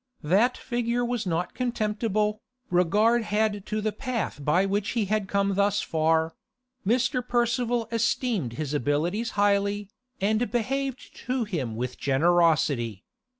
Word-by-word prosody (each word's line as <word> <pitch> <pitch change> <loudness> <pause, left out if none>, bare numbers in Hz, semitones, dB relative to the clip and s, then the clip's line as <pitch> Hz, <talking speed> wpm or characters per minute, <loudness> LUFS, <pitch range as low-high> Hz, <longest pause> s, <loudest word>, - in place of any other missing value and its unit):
That 205 +11 +3
figure 240 0 -1
was 240 -4 -2
not 175 +1 -1
contemptible, 215 -3 -1 0.3
regard 210 +7 +3
had 210 -1 0
to 215 0 -2
the 215 0 0
path 230 - -3
by 175 +7 +3
which 200 +1 -1
he 220 - +2
had 210 0 -1
come 200 0 +1
thus 200 +1 +2
far; 160 0 +1 0.5
Mr. 250 +4 +1
Percival 240 -1 0
esteemed 225 - 0
his 145 +3 -4
abilities 155 - 0
highly, 200 0 +2 0.3
and 215 +4 +1
behaved 260 +3 -2
to 250 -1 0
him 150 - -3
with 125 +2 -4
generosity. 140 - +2
205 Hz, 130 wpm, -26 LUFS, 170-235 Hz, 0.5 s, That